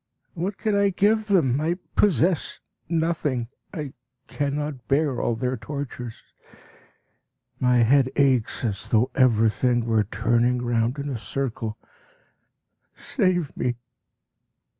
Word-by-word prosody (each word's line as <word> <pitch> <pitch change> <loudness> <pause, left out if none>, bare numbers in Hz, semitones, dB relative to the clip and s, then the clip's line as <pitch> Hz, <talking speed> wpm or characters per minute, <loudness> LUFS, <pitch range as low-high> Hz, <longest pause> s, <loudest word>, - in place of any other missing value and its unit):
What 190 +3 -3
can 215 -2 -1
I 200 0 +3
give 210 +3 +2
them? 150 - +2
I 170 +3 0 0.2
possess 180 -3 +2 0.3
nothing. 160 -8 0 0.2
I 150 -4 -5 0.3
cannot 145 -2 -3
bear 140 -2 +1
all 120 - 0
their 125 +2 -1
tortures; 125 -2 -6 1.4
my 125 -2 +4
head 130 +2 +4
aches 130 -4 +2
as 100 -4 -3
though 120 +3 +2
everything 120 -1 +3
were 110 -2 +2
turning 120 +3 +1
round 120 +2 0
in 140 0 -4
a 135 -4 -3
circle. 110 0 -4 1.2
Save 185 - 0
me! 125 -1 -1
130 Hz, 115 wpm, -24 LUFS, 120-160 Hz, 1.4 s, my